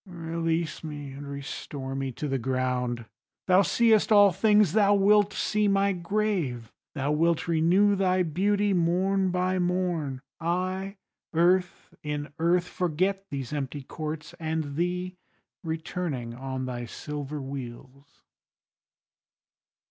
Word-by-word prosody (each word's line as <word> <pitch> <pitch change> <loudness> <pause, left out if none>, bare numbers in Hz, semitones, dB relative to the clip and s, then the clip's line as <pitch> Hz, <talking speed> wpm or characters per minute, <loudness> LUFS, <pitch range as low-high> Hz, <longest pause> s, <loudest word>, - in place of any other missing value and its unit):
Release 165 -2 -2
me, 145 -3 -6
and 140 +1 -8
restore 140 -1 -6
me 135 -1 -2
to 150 - -4
the 135 -1 -1
ground; 125 -1 -1 0.4
Thou 185 +1 +5
seest 220 +3 +3
all 205 -2 +7
things, 210 -1 +4
thou 205 -1 +5
wilt 205 +1 +4
see 210 0 0
my 200 0 +3
grave: 175 - -2 0.2
Thou 140 0 -1
wilt 165 +2 +1
renew 175 +5 +4
thy 185 -1 +2
beauty 200 +5 +1
morn 185 +2 +2
by 185 +1 0
morn; 175 -7 -1 0.2
I 185 +4 -2 0.4
earth 180 +2 +1
in 150 -1 -4
earth 175 +2 +2
forget 185 +3 -1
these 140 -3 -5
empty 140 -1 -4
courts, 155 +2 -6
And 160 -3 -2
thee 180 +2 -2 0.5
returning 160 -6 -3
on 130 +1 -4
thy 120 -1 -4
silver 150 +3 -6
wheels. 135 +1 -9
165 Hz, 120 wpm, -27 LUFS, 140-185 Hz, 0.5 s, all